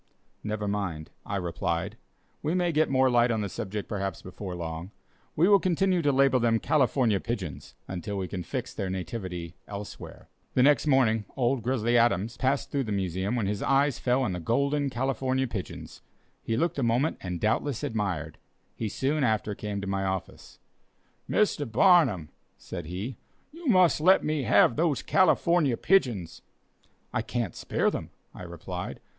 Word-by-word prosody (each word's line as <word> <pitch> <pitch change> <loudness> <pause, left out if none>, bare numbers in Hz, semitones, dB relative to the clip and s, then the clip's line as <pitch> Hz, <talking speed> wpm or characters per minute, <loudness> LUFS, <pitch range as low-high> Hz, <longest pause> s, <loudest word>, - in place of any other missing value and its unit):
"Never 105 -1 -3
mind," 95 -7 -3 0.2
I - - -2
replied, 90 +2 -2 0.5
"we 155 +4 -1
may 175 -1 +1
get 155 0 +2
more 130 0 +4
light 120 -1 +4
on 110 -2 0
the 100 - -3
subject, 105 +1 -5
perhaps, 100 -2 -4
before 95 0 -7
long. 85 +1 -5 0.5
We 170 +4 +4
will 200 -1 +6
continue 185 0 +1
to 145 -2 +2
label 135 -1 +4
them 115 -1 +3
'California 130 -8 +2
Pigeons' 100 - -5
until 95 +2 -4
we 95 -1 -2
can 90 -1 -5
fix 85 - -5
their 95 - -3
nativity 90 -2 -5
elsewhere." 100 0 -8 0.3
The 125 - +5
next 145 +2 +4
morning, 115 -6 +3
"Old 125 0 +1
Grizzly 120 0 +2
Adams," 115 0 +2
passed 135 +2 0
through 140 -2 0
the 110 - -4
Museum 95 +2 -1
when 115 -4 0
his 100 +1 -2
eyes 140 -1 +2
fell 125 +1 +1
on 115 - 0
the 90 - -3
"Golden 140 - +1
California 130 +1 -1
Pigeons." 100 -5 -7 0.4
He 115 - -2
looked 165 0 0
a - - 0
moment 120 +5 +1
and 90 -2 -4
doubtless 115 - 0
admired. 100 -8 -3 0.4
He 110 - -3
soon 140 +6 0
after 110 -3 +1
came 100 -1 -4
to - - -5
my 95 0 -1
office. 95 -1 -5 0.7
"Mr. 150 - +1
Barnum," 130 - +4 0.3
said - - -7
he, 95 +9 -5 0.3
"you 330 +1 -9
must 185 - +4
let 185 +4 +5
me 150 -3 -1
have 115 +1 +5
those 160 -4 +1
California 170 -8 +3
pigeons." 120 - +1 0.7
"I - - +1
can't 120 -7 -3
spare - - 0
them," - - -5 0.2
I - - -10
replied. 90 +1 -6
115 Hz, 165 wpm, -27 LUFS, 95-140 Hz, 0.7 s, will